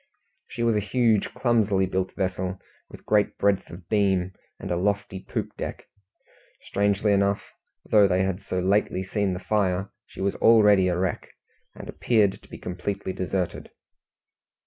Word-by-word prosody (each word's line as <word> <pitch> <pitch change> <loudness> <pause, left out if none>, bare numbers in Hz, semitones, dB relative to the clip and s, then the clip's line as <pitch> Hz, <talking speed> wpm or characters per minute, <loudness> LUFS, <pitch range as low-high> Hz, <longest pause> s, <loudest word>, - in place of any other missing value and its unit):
She 120 - -4
was 115 -1 +2
a - - +2
huge, 110 0 +1
clumsily 110 -6 +2
built 95 0 -2
vessel, 95 -1 -2 0.3
with - - -13
great 105 -1 +2
breadth 100 -1 +1
of 85 0 -11
beam, 95 -3 +1 0.3
and 95 - -6
a - - +1
lofty 100 +1 -1
poop - - -5
deck. - - -6 0.8
Strangely 100 +1 +1
enough, 100 0 +1 0.4
though 105 -2 +5
they 95 0 +2
had 95 0 -2
so 90 -1 -3
lately 95 0 +1
seen 100 0 -1
the 90 - -4
fire, 95 0 0 0.2
she - - -14
was 100 +1 0
already 105 -4 +5
a 90 -1 0
wreck, 90 -2 -2 0.5
and - - -10
appeared 105 -5 +1
to - - -20
be - - -9
completely 95 +1 -4
deserted. 95 -1 -3
100 Hz, 155 wpm, -25 LUFS, 95-105 Hz, 0.8 s, though